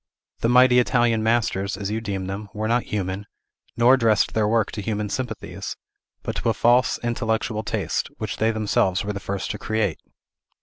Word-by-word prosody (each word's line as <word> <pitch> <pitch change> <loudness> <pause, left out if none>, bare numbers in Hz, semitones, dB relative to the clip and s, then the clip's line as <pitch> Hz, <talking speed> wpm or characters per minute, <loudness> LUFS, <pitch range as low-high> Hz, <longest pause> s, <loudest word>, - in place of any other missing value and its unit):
The 115 - +1
mighty 125 0 +6
Italian 120 -2 +2
masters, 110 -4 0
as 100 0 -3
you 110 +1 -2
deem 100 -4 -3
them, 100 +2 -5
were 110 +1 -2
not 120 +2 +1
human, 100 0 -3 0.5
nor 120 +2 +6
addressed 110 -6 +3
their 110 -1 +2
work 110 -1 +1
to 105 - -5
human 105 0 -2
sympathies, 120 -2 -5 0.5
but - - -4
to - - 0
a - - +1
false 120 0 +3
intellectual 110 -2 -1
taste, 110 - -2
which - - -4
they 110 - +2
themselves 105 -3 +1
were 105 - -2
the 100 - -4
first 100 +1 -3
to - - -6
create. 110 -6 -1
110 Hz, 180 wpm, -23 LUFS, 100-115 Hz, 0.5 s, mighty